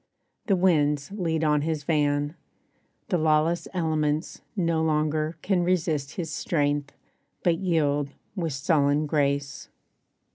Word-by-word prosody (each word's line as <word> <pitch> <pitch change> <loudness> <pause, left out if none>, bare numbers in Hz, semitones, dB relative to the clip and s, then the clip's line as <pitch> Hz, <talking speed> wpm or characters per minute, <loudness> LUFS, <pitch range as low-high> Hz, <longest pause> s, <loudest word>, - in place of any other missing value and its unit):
The 200 - +4
winds 150 -5 +2
lead 165 -5 -1
on 150 -1 +3
his 155 -1 -2
van; 145 -1 +1 0.8
The 180 - +1
lawless 155 +2 +2
elements 155 -3 -1
no 165 -4 +1
longer 155 0 0
can 190 -2 +2
Resist 160 -5 0
his 165 -3 -4
strength, 145 -3 -1 0.5
but 170 -2 +2
yield 145 -6 +1 0.3
with 165 -6 -2
sullen 145 0 +2
grace. 140 -2 -1
155 Hz, 115 wpm, -26 LUFS, 145-170 Hz, 0.8 s, The